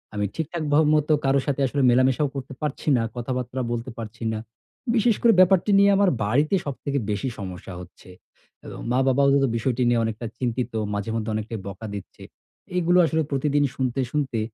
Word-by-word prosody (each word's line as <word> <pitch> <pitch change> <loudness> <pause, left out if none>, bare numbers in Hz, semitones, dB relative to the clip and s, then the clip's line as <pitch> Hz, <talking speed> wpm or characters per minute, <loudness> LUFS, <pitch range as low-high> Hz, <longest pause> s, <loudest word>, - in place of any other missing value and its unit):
আমি 105 0 0
ঠিকঠাক 160 +1 -3
ভা 150 - +6 0.2
মতো 150 0 +2
কারো 135 +1 +3
সাথে 140 -1 -1
আসলে 140 +2 -1
মেলামেশাও 130 +3 +3
করতে 135 0 -6
পারছি 150 0 -4
না, 115 - 0
কথাবার্তা 125 +1 -3
বলতে 120 +2 -4
পারছি 110 0 -8
না। 110 - -3 0.6
বিশেষ 230 -1 +3
করে 230 -1 +5
ব্যাপারটি 185 +2 +5
নিয়ে 200 0 +6
আমার 200 -1 +4 0.2
বাড়িতে 145 - +2
সবথেকে 140 0 -3
বেশি 105 +6 -2
সমস্যা 95 -1 -7
হচ্ছে। 90 +1 -15 0.5
অ্যা - - -10 0.2
মা-বাবাও 135 +2 +3
এব 140 - +2
বিষয়টি 125 +2 0
নিয়ে 120 -1 +3
অনেকটা 110 +1 -4
চিন্তিত, 125 0 -2 0.2
মাঝে 105 +2 -3
মধ্যে 110 -1 -2
অনেকটাই 110 +1 -4
বকা 100 +3 -7
দিচ্ছে। 100 - -10 0.5
এইগুলো 180 0 +3
আসলে 160 0 0
প্রতিদিন 145 +1 +1
শুনতে, 130 0 -1
শুনতে 135 -6 -1
130 Hz, 175 wpm, -24 LUFS, 115-150 Hz, 0.6 s, ভা